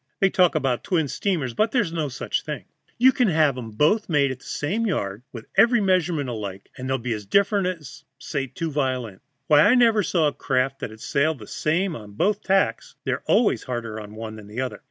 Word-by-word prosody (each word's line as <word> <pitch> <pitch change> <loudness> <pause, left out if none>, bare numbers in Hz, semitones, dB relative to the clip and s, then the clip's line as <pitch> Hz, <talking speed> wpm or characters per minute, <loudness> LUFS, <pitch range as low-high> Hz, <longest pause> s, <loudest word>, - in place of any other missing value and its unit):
They 195 -1 +3
talk 180 -3 +3
about 135 -5 0
twin 165 -6 0
steamers, 150 - -1
but 215 - +2
there's 220 -9 0
no 155 -4 -1
such 135 - -2
thing. - - -6 0.3
You 255 +2 +6
can 250 -3 +2
have 155 -6 +3
'em 120 -3 -6
both 150 - +1
made 140 -4 +2
in 130 - -7
the - - -20
same 210 +10 -2
yard, 100 - -2
with 115 -2 -9
every 235 0 +5
measurement 180 -7 +1
alike, 100 -5 -6
and 130 +1 -6
they'll 135 - +1
be 120 -1 -3
as 105 -2 -6
different, 200 - +2 0.2
sir, 125 - -12 0.4
as - - 0
as - - -27
two 165 -2 -3
violins. 130 -8 -2 0.2
Why, 150 0 +5
I 250 - +6
never 230 -4 +5
saw 165 -3 +1
a 145 - -1
craft 135 +1 -1
that'd 110 -1 -7
sail 155 +3 +1
the 110 -6 -11
same 165 - -1
on 105 -4 -10
both 205 - +1
tacks; 195 - 0
they're - - -2
always 235 - +3
harder 115 -4 -4
on 105 0 -10
one 110 0 -7
than 105 -2 -11
the 105 +4 -7
other. 130 - -4
145 Hz, 220 wpm, -24 LUFS, 120-190 Hz, 0.4 s, You